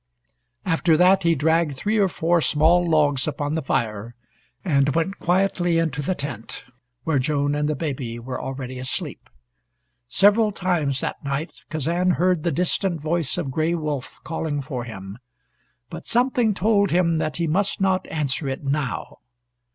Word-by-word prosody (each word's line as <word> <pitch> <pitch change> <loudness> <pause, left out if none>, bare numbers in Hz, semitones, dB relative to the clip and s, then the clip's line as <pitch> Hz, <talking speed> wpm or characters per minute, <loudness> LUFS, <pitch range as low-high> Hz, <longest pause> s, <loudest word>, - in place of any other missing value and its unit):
After 165 -2 +3
that 185 +3 +5
he 170 -2 +3
dragged 160 -1 +1
three 215 +8 0
or 200 - +4
four 170 -1 +1
small 165 +5 +3
logs 145 -4 +2
upon 145 0 -2
the 160 - -1
fire, 115 -4 -2 0.5
and 140 -5 +2
went 180 +4 -1
quietly 175 -1 +1
into 155 -4 0
the 180 +6 -1
tent 140 -8 -6 0.4
where 155 -2 +1
Joan 145 +1 0
and 150 0 0
the 150 - 0
baby 130 -6 -4
were 125 +2 -5
already 130 -1 -5
asleep. 130 - -4 0.8
Several 210 - +4
times 170 -8 0
that - - -4
night 140 +4 -4
Kazan 170 +4 +1
heard 180 -2 +2
the 170 - 0
distant 175 +2 +1
voice 155 0 -1
of 155 -7 -2
Gray 160 +5 0
Wolf 150 -5 -4
calling 160 -2 -3
for 130 -3 -5
him, 100 -1 -8 0.7
but 165 0 -8
something 245 -3 +2
told 200 0 +2
him 170 -2 +2
that 155 - -2
he 170 - 0
must 190 +5 0
not 190 -1 +1
answer 145 -2 -1
it 135 +2 -4
now. 140 -2 -3
160 Hz, 160 wpm, -23 LUFS, 140-175 Hz, 0.8 s, that